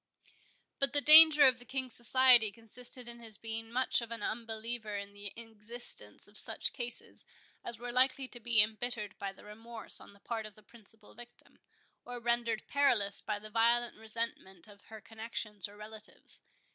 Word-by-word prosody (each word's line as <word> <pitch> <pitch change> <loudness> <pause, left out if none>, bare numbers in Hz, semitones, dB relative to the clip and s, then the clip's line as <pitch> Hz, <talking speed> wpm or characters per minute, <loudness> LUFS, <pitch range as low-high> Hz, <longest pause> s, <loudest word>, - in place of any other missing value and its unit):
But 275 0 0
the 290 - +6
danger 305 0 +10
of 255 -2 +3
the - - -12
King's 260 -1 -3
society 240 -2 +6
consisted 240 +3 -3
in 235 0 -9
his 225 -3 -5
being 225 0 -7
much 255 +1 0
of 230 - -8
an 230 -2 -7
unbeliever 225 -1 -5
in 200 0 -9
the 205 -1 -7
existence 230 +1 -6
of - - -3
such - - +1
cases 245 -1 -5 0.4
as 235 - -6
were 240 +1 -8
likely 260 +2 +1
to 240 - -9
be 230 -2 +4
embittered 215 -1 -6
by 200 -1 -5
remorse 220 +4 -2
on - - -16
the 200 - -22
part 220 +1 -6
of 210 - -17
the 215 - -21
principal 220 -1 -20
victim, 240 +1 -16 0.4
or 245 0 -9
rendered 235 -2 -2
perilous 240 -8 +1
by 210 - -4
the 215 +1 -13
violent 235 +2 +1
resentment 220 -5 -5
of 200 -1 -18
her 220 -1 -12
connexions 220 -3 -5
or 205 - -17
relatives. 215 0 -8
230 Hz, 170 wpm, -31 LUFS, 215-240 Hz, 0.4 s, danger